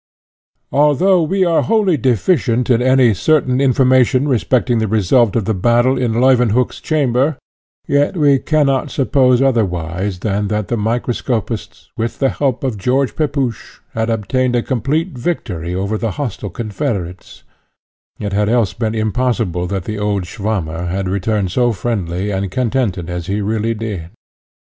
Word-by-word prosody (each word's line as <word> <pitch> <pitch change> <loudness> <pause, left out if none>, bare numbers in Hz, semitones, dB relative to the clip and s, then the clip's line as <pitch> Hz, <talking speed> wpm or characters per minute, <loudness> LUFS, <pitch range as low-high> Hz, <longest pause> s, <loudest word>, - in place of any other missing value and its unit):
Although 160 +6 +3
we 185 +4 +1
are 170 -2 +2
wholly 210 -6 +2
deficient 125 - +1
in 120 0 +3
any 130 -2 +4
certain 130 +3 +1
information 130 0 +3
respecting 125 -2 +1
the 110 - 0
result 110 +2 +2
of 115 -4 0
the 110 - 0
battle 120 +6 +2
in 125 -3 -1
Leuwenhock's 125 -2 +2
chamber, 140 -1 +1 0.5
yet 145 +5 +1
we 145 -3 +4
cannot 140 -3 +1
suppose 130 -3 +2
otherwise 95 -6 -1
than 105 -1 -1
that 105 -1 -2
the 120 - 0
microscopists, 115 -1 -3
with 115 0 -3
the 135 - +2
help 135 -2 -1
of 125 -6 -2
George 130 +5 0
Pepusch, 140 -7 -2 0.2
had 110 0 -1
obtained 125 +3 0
a 120 - +1
complete 140 - -1
victory 90 - -3
over 100 +3 -2
the 115 -3 -2
hostile 120 -7 -4
confederates: 100 - -5 0.7
it 100 -1 -4
had 105 +1 +1
else 115 -4 +1
been 115 -2 -2
impossible 110 -5 -1
that 95 -1 -3
the 110 +3 -5
old 105 -2 -1
Swammer 90 -5 -3
had 95 +2 -2
returned 100 0 -1
so 120 +4 +2
friendly 100 -3 -2
and 95 0 -2
contented 110 -5 -1
as 90 -1 -5
he 100 +2 -1
really 110 +2 -1
did. 105 -7 -5
115 Hz, 150 wpm, -17 LUFS, 100-130 Hz, 0.7 s, any